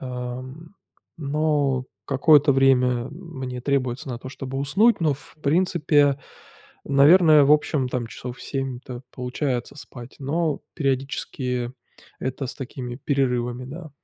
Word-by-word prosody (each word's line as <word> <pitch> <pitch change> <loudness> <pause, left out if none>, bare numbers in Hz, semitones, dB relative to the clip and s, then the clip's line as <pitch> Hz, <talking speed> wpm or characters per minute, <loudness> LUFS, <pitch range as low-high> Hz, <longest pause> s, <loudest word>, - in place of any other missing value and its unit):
ам, 130 +6 -7 0.4
но 145 -3 0 0.2
какое-то 145 +1 +5
время 125 -2 +3
мне 135 -7 -7
требуется 130 -2 -1
на 120 -2 -4
то 130 - -9
чтобы 135 0 -6
уснуть, 195 +13 +3
но 155 -4 +2
в 145 - -16
принципе, 145 -3 +3 0.7
наверное, 150 +2 +6
в 145 - +5
общем 145 -3 +2
там 120 -2 -2
часов 125 +2 -8
7-то 130 -2 -5
получается 125 +1 -3
спать, 125 -4 -11
но, 150 +2 -1
периодически, 130 -3 -2 0.5
это 130 +1 -3
с - - -6
такими 125 -2 -6
перерывами, 125 -3 -1
да. 155 +3 -9
135 Hz, 120 wpm, -24 LUFS, 125-150 Hz, 0.7 s, наверное